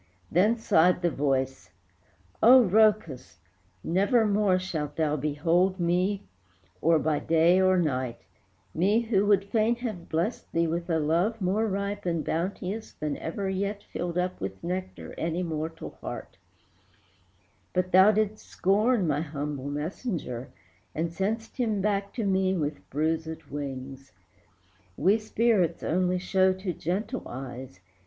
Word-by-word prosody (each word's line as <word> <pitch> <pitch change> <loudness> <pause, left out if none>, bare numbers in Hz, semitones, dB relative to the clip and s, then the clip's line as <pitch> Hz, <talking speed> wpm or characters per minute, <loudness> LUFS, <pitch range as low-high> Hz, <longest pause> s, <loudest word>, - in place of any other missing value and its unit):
Then 210 +7 +3
sighed 180 -4 +3
the 175 - +2
voice, 135 -9 -1 0.7
"Oh, 245 0 +8
Rhœcus! 210 - +2 0.5
nevermore 205 +1 +2
Shalt 160 -6 -4
thou 155 -2 +1
behold 165 +6 +1
me 180 +3 +1 0.6
or 165 0 +4
by 155 -1 0
day 165 +3 +4
or 185 0 +4
night, 130 -8 -1 0.6
Me, 200 +7 +2
who 205 -4 +1
would 200 -2 +4
fain 220 +3 +1
have 225 -8 -6
blessed 170 +9 -2
thee 165 0 +2
with 170 +2 -3
a 165 - +2
love 170 +9 +1
More 200 +4 +1
ripe 200 0 -3
and 170 -2 -1
bounteous 190 +5 -3
than 150 -1 -3
ever 195 +4 -4
yet 200 +2 -2
Filled 175 0 -4
up 180 0 -2
with 95 0 -5
nectar 185 +2 -5
any 170 +2 -1
mortal 160 -1 -4
heart: - - -7 1.4
But 185 0 -1
thou 190 +3 +7
didst 215 0 +1
scorn 210 +2 +1
my 150 -2 0
humble 145 -3 -4
messenger, 150 - -4 0.5
And 165 +1 -1
sent'st 220 +7 -3
him 220 -5 0
back 200 0 0
to 230 - -2
me 190 -1 +1
with 150 -2 -4
bruisèd 160 +2 -2
wings. 135 -1 -6 0.9
We 195 +8 +3
spirits 215 -5 +1
only 180 +2 +1
show 185 +1 +2
to 190 -1 -4
gentle 195 - -3
eyes. 125 -5 -8
180 Hz, 135 wpm, -27 LUFS, 155-200 Hz, 1.4 s, Oh